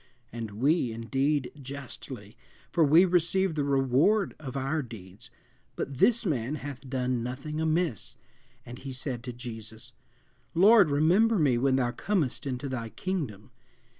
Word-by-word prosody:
and 115 -2 -5
we, 140 -1 +2
indeed, 135 +4 -1
justly, 140 -1 -8 0.4
for 165 - +3
we 160 +5 +6
receive 180 +1 +2
the 150 -2 -1
reward 140 - +2
of 135 -3 -6
our 135 +4 -1
deeds; 110 -2 -11 0.5
but 135 -2 -5
this 235 +3 +4
man 135 - -1
hath 140 -3 -8
done 125 -2 -1
nothing 135 +6 -4
amiss. 160 -4 -1 0.5
And 120 0 -9
he 135 -1 -7
said 130 -2 -4
to 125 - -4
Jesus, 115 -1 -9 0.6
Lord, 200 0 +7
remember 180 +10 +3
me 145 -7 +3
when 135 +1 +2
thou 125 -2 +1
comest 160 -5 -1
into 130 +1 -3
thy 120 -4 -4
kingdom. 130 - -4
135 Hz, 140 wpm, -28 LUFS, 125-160 Hz, 0.6 s, Lord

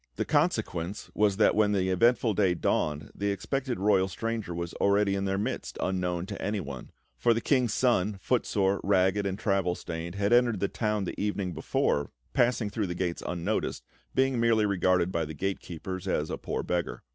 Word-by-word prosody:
The - - -1
consequence 90 +4 -1
was 100 -2 +2
that 110 - +5
when 105 -1 +3
the 95 -2 +1
eventful 115 +3 +3
day 95 -3 +2
dawned, 75 -2 -1
the 100 +1 -2
expected 125 +5 -2
royal 95 -1 +3
stranger 110 +2 -3
was 85 0 -4
already 100 0 +3
in 100 0 -1
their 95 0 0
midst, 100 - -3
unknown 90 -2 -1
to 100 0 -7
anyone; 95 -10 -4 0.3
for 115 - +4
the - - +1
King's 125 -3 +1
Son, 105 -5 +2
footsore, 100 -3 +1
ragged, 95 +1 +2
and 95 0 -3
travel 95 -4 +1
stained, 85 +1 -6
had 100 +3 +1
entered 120 -4 +4
the 100 - +1
town 105 -2 -1
the 90 - -4
evening 100 -3 -1
before, 70 -3 0 0.2
passing 120 -5 +2
through 105 -2 -1
the 90 - -4
gates 90 -1 -2
unnoticed, 90 +5 -2 0.3
being 130 -2 +2
merely 115 -2 +3
regarded 95 -2 +2
by 85 -3 0
the 80 0 -6
gate 95 +5 -2
keepers 90 +2 -6
as - - 0
a - - -2
poor - - -3
beggar. 90 -1 -2
100 Hz, 185 wpm, -28 LUFS, 90-105 Hz, 0.3 s, that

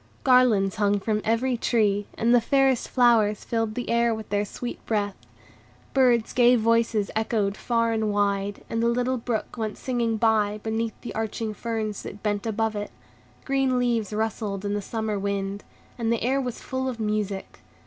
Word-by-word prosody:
Garlands 240 -7 +4
hung 205 -1 +2
from 210 +1 -1
every 245 +3 +1
tree, 205 -4 +1
and 235 +2 +2
the 245 - +6
fairest 270 0 +2
flowers 230 -5 +3
filled 225 -2 -1
the 245 - -3
air 235 -1 +2
with 220 -1 -8
their 205 0 0
sweet 240 +4 -7
breath. 205 -3 0 0.8
Bird's 245 -4 +3
gay 245 0 +5
voices 230 -2 +2
echoed 220 -2 0
far 230 0 0
and 220 -1 0
wide, 200 0 0
and 230 - -2
the 235 - +2
little 250 +2 +1
brook 230 0 -3
went 215 -1 -3
singing 235 -3 -1
by, 215 -2 +2
beneath 225 0 -2
the - - -6
arching 220 0 -3
ferns 215 -1 -3
that 205 - -9
bent 205 0 -1
above 220 0 -1
it; 205 0 -4 0.6
green 270 -2 +1
leaves 235 -4 0
rustled 210 -2 -2
in 205 - -1
the 205 - -1
summer 220 -1 -3
wind, 200 0 -3 0.4
and 230 -1 0
the 235 - 0
air 265 +3 +1
was 250 -3 -5
full 260 0 -2
of 240 -3 -6
music. 210 -2 -2
225 Hz, 175 wpm, -25 LUFS, 205-235 Hz, 0.8 s, the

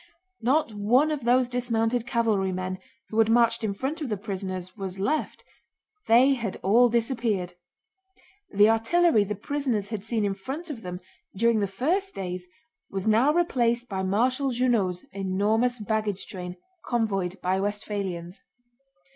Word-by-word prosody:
Not 255 0 +1
one 245 +9 +3
of 285 -6 -3
those 250 +1 +4
dismounted 240 -1 0
cavalrymen 190 -6 0 0.3
who 220 - -1
had 225 0 +4
marched 230 0 +3
in 215 - 0
front 270 +11 -4
of 290 - -3
the 210 - -1
prisoners 185 -2 -5
was 195 -3 -5
left; 280 +11 -2 0.6
they 250 +5 +6
had 230 -7 -3
all 240 +5 +5
disappeared. 230 -6 -1 1.0
The 205 +1 +5
artillery 225 +3 +3
the 210 +1 -3
prisoners 235 -3 -2
had 215 -3 -4
seen 220 -1 0
in 200 - 0
front 275 - -6
of 245 -6 -7
them 180 -2 -6 0.3
during 230 +2 +3
the 200 - +1
first 335 - 0
days 180 -1 -5 0.4
was 195 -1 -4
now 230 +7 +4
replaced 245 -8 +1
by 190 -2 -2
Marshal 250 +8 +1
Junot's 230 -8 0
enormous 205 +6 +1
baggage 215 -2 -2
train, 180 -3 -7 0.3
convoyed 195 -6 -1
by 185 +1 0
Westphalians. 195 -3 -4
220 Hz, 145 wpm, -26 LUFS, 195-245 Hz, 1.0 s, they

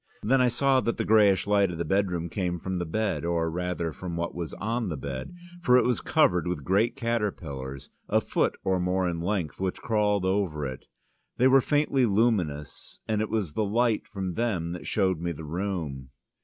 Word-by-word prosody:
Then 130 +5 +3
I 125 - +5
saw 130 +2 +3
that 115 - -1
the 115 - -1
greyish 105 -3 +4
light 100 -2 +3
of 85 - -5
the 85 - -2
bedroom 90 -1 0
came 90 -1 -2
from 95 +1 -3
the 90 - -3
bed, 110 +5 -1
or 85 -1 0
rather 90 -1 -2
from 85 0 -6
what 85 0 -2
was 85 -3 -5
on 115 0 -2
the 80 - -3
bed. 65 - -6 0.3
For 125 -5 +5
it - - +3
was 125 -1 +1
covered 90 - +2
with 90 -5 -3
great 100 - +2
caterpillars, 90 - -3 0.2
a - - +4
foot - - 0
or 95 -1 +1
more 90 +1 +1
in 85 -1 -2
length, 90 -3 -2
which 95 -1 -2
crawled 105 -4 +1
over 95 -6 0
it. 65 -2 -6 0.5
They 130 - +5
were 135 0 +6
faintly 140 -3 +2
luminous, 95 -10 -1
and 110 -1 0
it 110 - -2
was 100 -9 -1
the 110 - 0
light 115 +2 +1
from 95 -5 -4
them 90 -5 -1
that 90 -1 -6
showed 95 -5 +1
me 85 0 -2
the 80 0 -8
room. 80 -6 -4
95 Hz, 200 wpm, -27 LUFS, 85-110 Hz, 0.5 s, were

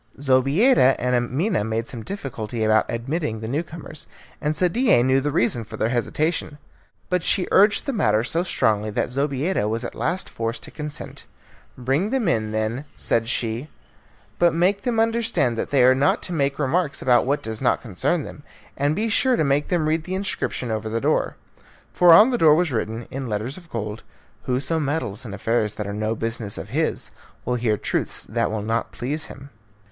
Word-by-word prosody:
Zobeida 135 - +4
and 125 +1 -1
Amina 125 - 0
made 110 +1 -2
some 120 - -7
difficulty 120 - -5
about 110 0 +3
admitting 120 0 -2
the 110 - -5
new 140 +7 0
comers, 165 -2 -8 0.3
and 150 +1 0
Sadie 180 - +3
knew 130 +1 +3
the 145 +2 -1
reason 120 -2 +1
of 110 - -6
their 110 - 0
hesitation. 150 +5 -1 0.5
But 180 -1 +1
she 180 +2 +2
urged 205 +2 +5
the 275 - -2
matter 110 - +2
so 165 +7 0
strongly 110 - +1
that 105 - -2
Zobeida 140 - 0
was 115 +2 -2
at - - -5
last 185 +1 -1
forced 115 +1 -4
to - - -9
consent. 150 -1 -7 0.5
"Bring 135 - 0
them 255 -5 0
in, 110 -9 0
then," 110 +6 -2
said 115 0 0
she, 120 +4 -1 0.7
"but 170 -2 +4
make 190 +4 +2
them 235 -1 0
understand 225 - +1
that - - -2
they 135 -3 +4
are 130 +1 +7
not 135 +2 +1
to 180 - -4
make 140 -3 0
remarks 150 +2 0
about 125 -1 +4
what 145 +2 0
does 110 0 -4
not - - +1
concern 130 - -1
them, 145 - -10 0.3
and 145 +2 +1
be 220 +3 0
sure 255 +3 +3
to 230 - +1
make 140 +1 +1
them 170 -4 0
read 160 +1 0
the 185 - -3
inscription 190 - -2
over 110 0 -2
the 115 +1 -1
door." - - 0 0.6
For 175 -1 +6
on 210 +10 +8
the 245 - 0
door 155 -2 +6
was 175 -1 +1
written 115 0 -3
in 135 -1 -4
letters 110 +6 -2
of 175 -3 -13
gold, 110 -3 -4 0.4
"Whoso 140 +6 -1
meddles 130 -6 -2
in 100 - -7
affairs 110 0 0
that 105 - -4
are 100 - -4
no 110 +2 -1
business 115 -2 -4
of - - -7
his, - - -1 0.3
will 125 - 0
hear 115 -3 +1
truths - - -2
that - - -1
will 105 -1 -3
not 115 +2 -1
please 145 +6 -3
him." 140 0 -11
135 Hz, 195 wpm, -23 LUFS, 115-165 Hz, 0.7 s, on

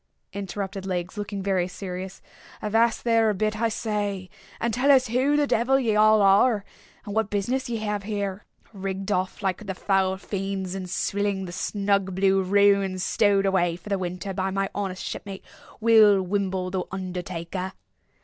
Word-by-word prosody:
interrupted 195 0 -5
Legs, 180 -1 -3
looking 205 -1 -4
very 190 -2 +1
serious, 185 0 -7 0.4
"avast 225 +2 +1
there 230 -2 +3
a 210 - 0
bit, 215 +2 -1
I 230 - +3
say, 205 -4 -3 0.3
and 235 -1 -1
tell 255 +5 +1
us 255 -3 +4
who 265 +5 +2
the 295 - +3
devil 265 +1 +2
ye 225 -5 +1
all 215 0 +5
are, 200 +2 +4 0.4
and 205 - -5
what 220 -1 0
business 245 +6 -1
ye 230 - -1
have 210 -1 -1
here, 200 -1 -3 0.3
rigged 195 0 -4
off 185 +2 -1
like 195 +2 -2
the 190 - -3
foul 190 -1 +1
fiends, 195 -1 -4
and 190 -1 -5
swilling 195 +2 -1
the 175 - -7
snug 200 0 0
blue 195 0 +3
ruin 200 0 +3
stowed 200 +1 +2
away 175 -3 +2
for 185 - -11
the 200 -1 0
winter 180 +2 -4
by 190 0 -1
my 195 0 -1
honest 195 -2 -3
shipmate, 195 -1 -6 0.3
Will 215 -3 +6
Wimble, 190 -1 -1
the 185 -1 -1
undertaker!" 185 0 -5
195 Hz, 170 wpm, -25 LUFS, 190-210 Hz, 0.4 s, Will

